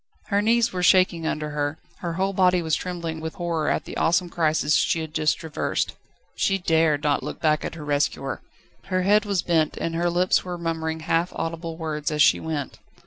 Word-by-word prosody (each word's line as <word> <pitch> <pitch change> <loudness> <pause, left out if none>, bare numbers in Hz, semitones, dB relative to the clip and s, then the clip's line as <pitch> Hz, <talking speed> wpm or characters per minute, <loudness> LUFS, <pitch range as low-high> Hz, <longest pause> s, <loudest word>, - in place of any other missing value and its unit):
Her 200 -1 +2
knees 230 +1 +2
were 180 - -2
shaking 180 -2 +4
under 150 -1 -2
her, 145 +1 -2 0.2
her 170 -2 -3
whole 190 +3 0
body 180 -2 +3
was 160 -1 +1
trembling 170 -3 -4
with 160 0 -5
horror 170 -3 -1
at - - -1
the - - -7
awesome 175 +1 +2
crisis 155 -3 +1
she 165 - +2
had 160 -1 -7
just 155 -1 +1
traversed. 160 -2 -2 0.4
She 195 - +1
dared 160 -4 +2
not 145 -1 +2
look - - -6
back 155 -1 +2
at - - -5
her 155 -3 -8
rescuer. 145 -2 -1 0.4
Her 185 -1 0
head 210 +2 +4
was 200 -3 0
bent, 160 -3 +1
and 165 - -2
her 170 +1 +1
lips 180 +2 +2
were 180 -1 -5
murmuring 160 -1 -3
half 165 +2 0
audible 165 0 -4
words 155 -2 -3
as 150 -1 +3
she - - +5
went. 155 -4 -4
165 Hz, 200 wpm, -24 LUFS, 155-180 Hz, 0.4 s, she